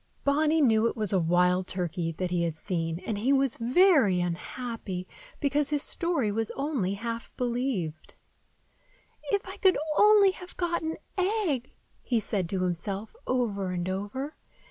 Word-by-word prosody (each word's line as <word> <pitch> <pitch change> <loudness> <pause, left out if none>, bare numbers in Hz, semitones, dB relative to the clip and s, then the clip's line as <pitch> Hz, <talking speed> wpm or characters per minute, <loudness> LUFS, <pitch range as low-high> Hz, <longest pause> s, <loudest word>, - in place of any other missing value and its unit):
Bonny 305 +3 +3
knew 225 -4 +4
it - - -3
was 210 -3 0
a 190 - +4
wild 180 +2 +2
turkey 175 -2 -2
that 180 +2 -3
he 175 -1 +1
had 165 -2 -1
seen, 165 -2 -2
and 215 -3 -2
he 250 +6 +1
was 270 -2 +3
very 250 - +4
unhappy 185 +2 -4 0.3
because 285 0 +1
his 295 -1 0
story 330 - 0
was 225 +1 -1
only 270 -10 -1
half 230 +2 -5
believed. 240 - -2 1.1
"If 405 -4 0
I 380 +2 -7
could 380 -2 +4 0.2
only 415 -2 +7
have 365 -1 -11
got 345 -1 0
an 320 0 -3 0.2
egg!" 365 - 0 0.3
he 240 -3 +1
said 195 -4 -2
to 185 -1 -1
himself, 190 - -3
over 210 -7 0
and 180 -1 -2
over. 205 +10 -4
230 Hz, 155 wpm, -28 LUFS, 185-295 Hz, 1.1 s, only